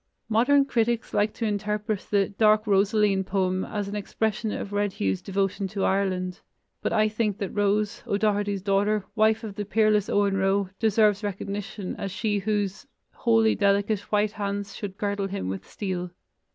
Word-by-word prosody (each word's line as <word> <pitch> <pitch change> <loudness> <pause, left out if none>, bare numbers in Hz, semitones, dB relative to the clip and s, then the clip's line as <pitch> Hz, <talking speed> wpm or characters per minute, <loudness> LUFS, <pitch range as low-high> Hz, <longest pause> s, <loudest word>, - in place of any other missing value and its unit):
Modern 275 +6 +4
critics 235 -3 0
like 210 +1 +2
to 230 - -2
interpret 210 0 -2
the 200 -2 +2
"Dark 215 +1 +3
Rosaleen" 200 -1 +3
poem 185 -1 0
as 205 -2 -3
an 200 - -5
expression 215 +1 -2
of 205 - -5
Red 205 -1 0
Hugh's 95 -1 -1
devotion 195 0 -1
to 195 +1 -3
Ireland, 185 -2 0 0.4
but - - -1
I 215 -1 +3
think 215 -2 -1
that 200 - -4
Rose, 205 0 0
O'Doherty's 205 -1 0
daughter, 205 +1 +1
wife 220 +1 +3
of 215 -3 -5
the 205 - -4
peerless 215 0 +2
Owen 200 -1 +2
Roe, 195 0 +1
deserves 215 -2 +3
recognition 200 0 -4
as 200 - -3
she 205 +1 -1
whose 205 +3 -2 0.2
"Holy 225 -2 +3
delicate 200 +1 +2
white 210 0 +2
hands 200 -1 -4
should 200 -2 -6
girdle 200 -1 -1
him 195 - -4
with 95 0 -5
steel." 185 -3 -3
205 Hz, 165 wpm, -26 LUFS, 195-215 Hz, 0.4 s, Modern